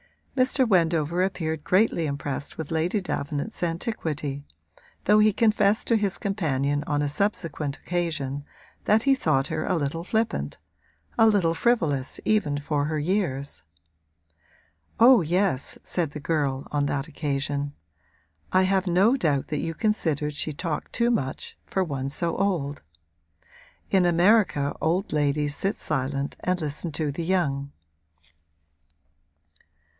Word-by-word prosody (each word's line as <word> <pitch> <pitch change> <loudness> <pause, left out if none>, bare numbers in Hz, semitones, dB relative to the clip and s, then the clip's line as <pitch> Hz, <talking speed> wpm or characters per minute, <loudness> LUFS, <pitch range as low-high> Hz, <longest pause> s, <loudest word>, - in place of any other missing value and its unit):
Mr. 260 0 +2
Wendover 170 -3 +2
appeared 160 -5 -1
greatly 185 -4 +2
impressed 140 -1 -4
with 160 -1 -5
Lady 165 +6 +1
Davenant's 145 -5 -4
antiquity, 160 - -2 0.6
though 210 +2 +5
he 215 0 +5
confessed 210 -1 +2
to 230 - +4
his 200 -3 0
companion 145 -8 -1
on 145 -1 +1
a 145 - 0
subsequent 155 -5 -2
occasion 155 -6 -2 0.4
that 220 +2 +4
he 275 - +5
thought 150 - +1
her - - -2
a 185 - +1
little 160 +1 -2
flippant, 220 +4 -1 0.6
a 225 - +7
little 195 -6 +3
frivolous 160 - 0
even 210 -10 +2
for 145 0 -1
her 155 +1 -1
years. 145 - -1 1.4
'Oh 240 -1 +8
yes,' 175 -3 0
said 165 -5 -1
the 150 - -6
girl, 140 -3 -1
on 145 -1 +1
that 140 +1 -2
occasion, 145 -2 -2 0.8
'I 185 0 +5
have 190 0 +1
no 190 +8 +4
doubt 150 - 0
that 150 - -1
you 165 +1 -3
considered 155 -9 0
she 155 +1 -3
talked 160 +1 -4
too 235 +1 +2
much, 135 - -3
for 190 - 0
one 135 -5 -3
so 165 +3 -1
old. 165 -8 -1 1.1
In 185 -2 +4
America 170 -5 +3
old 175 +4 0
ladies 145 0 +1
sit 195 +6 -1
silent 140 +2 -2
and 180 0 0
listen 155 +1 -3
to 150 -1 -1
the 165 +4 -4
young.' 140 -7 0
160 Hz, 135 wpm, -25 LUFS, 145-195 Hz, 1.4 s, Oh